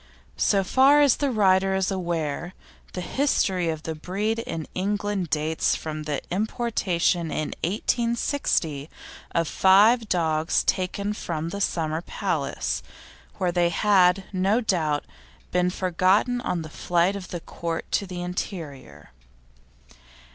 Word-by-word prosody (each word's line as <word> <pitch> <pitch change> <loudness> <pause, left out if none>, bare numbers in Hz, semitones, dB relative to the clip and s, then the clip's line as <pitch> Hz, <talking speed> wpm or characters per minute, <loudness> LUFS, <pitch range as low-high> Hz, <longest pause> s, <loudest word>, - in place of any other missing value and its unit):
So 195 -1 +3
far 270 +8 +5
as 285 -4 +5
the 285 - 0
writer 195 -4 +3
is 190 0 0
aware, 170 -2 -3 0.4
the 180 - -4
history 185 - +1
of 160 -1 -4
the 160 - -3
breed 200 +8 -2
in 165 -8 -4
England 200 -1 -1
dates 155 +2 +1
from 155 -1 -5
the 150 -2 -3
importation 190 -5 0
in 155 -1 -2
1860 210 - 0 0.5
of 165 -1 +2
five 210 +6 +5
dogs 160 -2 +1
taken 200 +3 -1
from 165 -5 -4
the 200 +3 -5
Summer 160 -4 -1
Palace, - - -2 0.6
where 185 -3 0
they 175 -1 +2
had, 190 0 +3
no 195 +5 +2
doubt, 160 -10 0 0.5
been 180 0 +2
forgotten 190 +7 +1
on 175 -8 -2
the 155 - -8
flight 175 +4 +1
of 195 -2 -6
the 175 - -5
Court 165 0 -4
to 200 - 0
the 180 -1 -5
interior. 150 - -6
180 Hz, 130 wpm, -25 LUFS, 165-205 Hz, 0.6 s, far